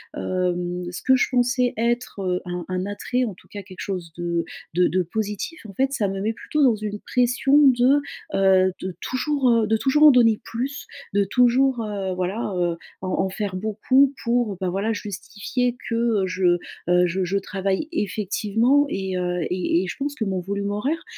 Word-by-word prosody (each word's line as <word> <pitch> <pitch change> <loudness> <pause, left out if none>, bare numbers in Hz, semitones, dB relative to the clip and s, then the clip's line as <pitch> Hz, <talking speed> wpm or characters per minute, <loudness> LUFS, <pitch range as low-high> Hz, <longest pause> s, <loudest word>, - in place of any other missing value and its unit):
hem, 180 -1 -2
ce 175 - -6
que 260 - +4
je 255 - +2
pensais 250 0 +1
être 235 -1 -1
heu, 180 -1 -1
un 180 -1 -4
un 185 0 -2
attrait, 225 +5 -2
en 215 - -4
tout - - -21
cas 205 - -8
quelque 185 -1 -13
chose 180 -4 -4
de 170 -1 -1 0.3
de 180 +2 +3
de 185 - +1
positif, 210 - -4
en 200 - -10
fait, 270 +5 +1
ça 210 -7 0
me 195 0 -3
met 220 +3 0
plutôt 300 +6 -1
dans 250 -4 +5
une 210 -1 -5
pression 250 +4 +2
de 260 +3 +4 0.3
heu, 190 -1 +4
de 185 -2 -5
toujours, 265 0 0
heu 230 -2 +3
de 220 +1 +2
toujours 275 +6 +2
en 305 - +10
donner 230 -4 +4
plus, 260 +5 -4 0.3
de 200 0 +3
toujours, 250 +4 +3
heu, 200 -3 -3
voilà, 190 +4 -2
heu, 175 -1 0 0.2
en 185 - -3
en 190 - -1
faire 195 0 -4
beaucoup, 225 +7 +2
pour, 235 -4 0
bah, 185 -2 -1
voilà, 200 +5 -1
justifier 215 +4 -3
que, 230 - -1 0.3
heu, - - 0
je 180 -1 +2 0.3
heu, 180 0 +5
je 185 +2 -1
je 185 +2 0
travaille 195 +6 -2
effectivement. 220 - +1
Et, 190 -4 -2
heu 180 0 -1
et 180 -1 +1
et - - -4
je - - -5
pense 285 +1 -3
que 225 - -2
mon 190 -2 -1
volume 200 +2 -3
horaire 270 +11 -2
205 Hz, 195 wpm, -23 LUFS, 185-245 Hz, 0.3 s, en